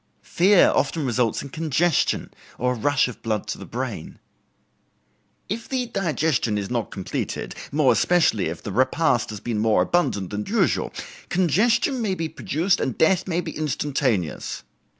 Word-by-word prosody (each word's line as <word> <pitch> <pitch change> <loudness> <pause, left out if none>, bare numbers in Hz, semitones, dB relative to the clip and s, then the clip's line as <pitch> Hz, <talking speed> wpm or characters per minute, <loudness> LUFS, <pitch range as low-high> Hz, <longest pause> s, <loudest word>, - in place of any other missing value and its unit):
Fear 190 +2 +4
often 145 +2 0
results 120 -2 0
in 140 - -8
congestion, 160 +3 0 0.3
or 125 +1 +1
a - - -4
rush 145 +4 +2
of 125 - -9
blood 110 -2 -2
to - - -4
the - - -9
brain. - - -5 1.3
"If 225 +4 -5
the 255 -2 -1
digestion 160 - 0
is 100 +1 -4
not 120 -3 -1
completed, 95 -2 -4 0.2
more 145 -3 +4
especially 165 - +2
if 80 +1 -6
the 100 - -5
repast 130 - +2
has 105 -2 -6
been 115 -3 -2
more 105 -4 +3
abundant 100 - 0
than 105 0 -3
usual, - - +1 0.4
congestion 215 - +2
may 200 -4 0
be 165 -2 -2
produced 175 +6 0
and 130 - -2
death 175 +3 +3
be 175 -1 -3
instantaneous. 135 - -1
145 Hz, 150 wpm, -23 LUFS, 115-175 Hz, 1.3 s, Fear